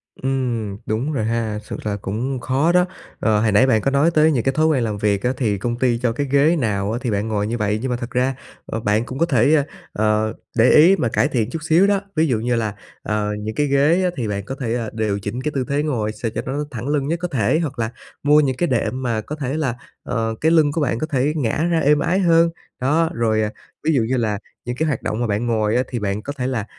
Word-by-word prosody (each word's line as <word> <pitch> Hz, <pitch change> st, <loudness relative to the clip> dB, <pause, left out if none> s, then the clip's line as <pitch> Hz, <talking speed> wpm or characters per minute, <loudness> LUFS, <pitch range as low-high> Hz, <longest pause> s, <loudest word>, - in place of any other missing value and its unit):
Ừm, 120 Hz, -6 st, -2 dB
đúng 120 Hz, +8 st, -1 dB
rồi 110 Hz, -6 st, -1 dB
ha, 110 Hz, -2 st, -1 dB
sự -, -, -6 dB
thật 105 Hz, -1 st, -2 dB
cũng 125 Hz, +8 st, -3 dB
khó 135 Hz, +7 st, +1 dB
đó. 180 Hz, 0 st, +4 dB, 0.3 s
Ờ, 110 Hz, -2 st, +2 dB
hồi 110 Hz, -1 st, +2 dB
nãy 105 Hz, +6 st, +5 dB
bạn 110 Hz, -5 st, +3 dB
có 135 Hz, -, 0 dB
nói 140 Hz, +5 st, +3 dB
tới 160 Hz, 0 st, +4 dB
những 120 Hz, -6 st, 0 dB
cái 135 Hz, -, +1 dB
thói 155 Hz, +2 st, +2 dB
quen 140 Hz, -6 st, +2 dB
làm 110 Hz, -2 st, -2 dB
việc 100 Hz, -1 st, 0 dB
á, 125 Hz, +1 st, +1 dB
thì 105 Hz, -6 st, 0 dB
công 120 Hz, +4 st, -2 dB
ty 120 Hz, -2 st, +2 dB
cho 120 Hz, -1 st, 0 dB
cái 140 Hz, +4 st, -2 dB
ghế 145 Hz, +4 st, +4 dB
nào 105 Hz, -8 st, -1 dB
á 115 Hz, -, -2 dB
thì 125 Hz, -3 st, -1 dB
bạn 105 Hz, +1 st, -1 dB
ngồi 105 Hz, -2 st, -1 dB
như 120 Hz, +2 st, -2 dB
vậy, 105 Hz, -1 st, 0 dB
nhưng 130 Hz, -, -2 dB
mà 120 Hz, -, 0 dB
thật 120 Hz, 0 st, -6 dB
ra 130 Hz, +1 st, +1 dB, 0.5 s
bạn 105 Hz, +3 st, +1 dB
cũng 130 Hz, +2 st, -7 dB
có 170 Hz, -, +4 dB
thể, 145 Hz, 0 st, +3 dB, 0.3 s
ờ, 110 Hz, +1 st, +1 dB, 0.2 s
để 115 Hz, +2 st, +5 dB
ý 170 Hz, +6 st, +7 dB
mà 130 Hz, -, 0 dB
cải 130 Hz, -, +2 dB
thiện 120 Hz, -6 st, -1 dB
chút 160 Hz, -, -4 dB
xíu 165 Hz, +5 st, +4 dB
đó. 200 Hz, -1 st, +2 dB
Ví 160 Hz, 0 st, +3 dB
dụ 120 Hz, -6 st, +1 dB
như 120 Hz, +2 st, 0 dB
là, 110 Hz, -3 st, -2 dB, 0.3 s
ờ, 105 Hz, -1 st, -1 dB
những 110 Hz, +1 st, -5 dB
cái 145 Hz, +3 st, +1 dB
ghế 145 Hz, +6 st, +3 dB
á, 180 Hz, -, +2 dB
thì 120 Hz, -4 st, -2 dB
bạn 100 Hz, -1 st, -3 dB
có 135 Hz, -, -5 dB
thể, 115 Hz, -4 st, -2 dB
ờ, 115 Hz, -2 st, -2 dB
điều 110 Hz, -3 st, -1 dB
chỉnh 105 Hz, +5 st, -4 dB
cái 150 Hz, -, -2 dB
tư 130 Hz, -2 st, 0 dB
thế 145 Hz, +1 st, +1 dB
ngồi 115 Hz, -8 st, -1 dB
sao 110 Hz, +1 st, -4 dB
cho 115 Hz, -, -1 dB
nó 145 Hz, +3 st, -2 dB
thẳng 120 Hz, 0 st, -5 dB
lưng 145 Hz, -2 st, 0 dB
nhất 165 Hz, +2 st, -1 dB
có 180 Hz, -, -2 dB
thể, 140 Hz, -1 st, +1 dB
hoặc 145 Hz, -7 st, -3 dB
là 110 Hz, 0 st, -1 dB, 0.3 s
mua 150 Hz, +1 st, +5 dB
những 135 Hz, -4 st, +1 dB
cái 175 Hz, -, +1 dB
đệm 125 Hz, 0 st, -1 dB
mà 115 Hz, -4 st, -1 dB
có 150 Hz, -, -6 dB
thể 140 Hz, -1 st, -3 dB
là, 135 Hz, -7 st, -1 dB, 0.3 s
ờ, 115 Hz, -2 st, -2 dB
cái 160 Hz, -, +3 dB
lưng 155 Hz, -3 st, +4 dB
của 160 Hz, +2 st, -1 dB
bạn 120 Hz, -5 st, 0 dB
có 155 Hz, -, -2 dB
thể 145 Hz, 0 st, +1 dB
ngả 145 Hz, +1 st, 0 dB
ra 165 Hz, -, +3 dB
êm 150 Hz, 0 st, +3 dB
ái 175 Hz, +5 st, +1 dB
hơn. 170 Hz, -2 st, +4 dB, 0.3 s
Đó, 160 Hz, +5 st, +2 dB
rồi, 110 Hz, -2 st, +1 dB
ờ, 105 Hz, -, 0 dB, 0.4 s
ví 160 Hz, -, +3 dB
dụ 135 Hz, -, +3 dB
như 125 Hz, +4 st, 0 dB
là 110 Hz, -4 st, 0 dB, 0.3 s
những 120 Hz, 0 st, -3 dB
cái 160 Hz, +5 st, 0 dB
hoạt 145 Hz, -, -1 dB
động 110 Hz, -, -2 dB
mà 120 Hz, -, 0 dB
bạn 105 Hz, +3 st, -1 dB
ngồi 110 Hz, -1 st, +1 dB
á 125 Hz, -, +3 dB
thì 120 Hz, -, -4 dB
bạn 100 Hz, 0 st, -2 dB
có 140 Hz, +6 st, -5 dB
thể 125 Hz, -, -1 dB
là, 120 Hz, -6 st, -2 dB
125 Hz, 275 wpm, -21 LUFS, 110-145 Hz, 0.5 s, ý